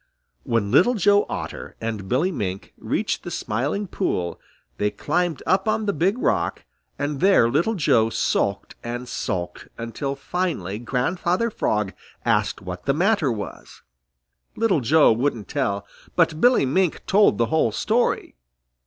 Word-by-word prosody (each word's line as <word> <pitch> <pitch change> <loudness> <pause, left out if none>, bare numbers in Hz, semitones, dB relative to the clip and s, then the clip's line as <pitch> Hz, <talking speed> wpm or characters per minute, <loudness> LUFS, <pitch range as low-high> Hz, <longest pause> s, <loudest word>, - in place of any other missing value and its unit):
When 100 - -1
Little 185 - +5
Joe 205 0 +3
Otter - - -6
and 110 -4 -4
Billy 155 +10 +2
Mink 100 - -4
reached - - -1
the - - -7
Smiling 140 - -2
Pool, 90 - -2 0.4
they 105 - +1
climbed 175 +5 -1
up 190 +4 +2
on 215 0 +1
the 200 - +1
Big 195 +7 +1
Rock, - - 0 0.3
and 145 -1 -2
there 190 -10 +5
Little 165 - +1
Joe 115 - +3
sulked - - -1
and 120 +1 -5
sulked, 90 -6 -4
until 125 +4 -4
finally 135 - -3
Grandfather 175 - 0
Frog 105 - -1 0.3
asked - - +1
what 90 -1 -7
the 140 - +2
matter 180 - +2
was. 105 -3 -7 0.7
Little 220 -8 +2
Joe 150 +5 +5
wouldn't 120 -3 -1
tell, 100 -9 -1 0.3
but 165 -2 +2
Billy 245 - +5
Mink 175 +6 0
told 200 - +4
the 115 - +3
whole 155 -8 +3
story. 225 - 0
145 Hz, 145 wpm, -23 LUFS, 115-185 Hz, 0.7 s, Little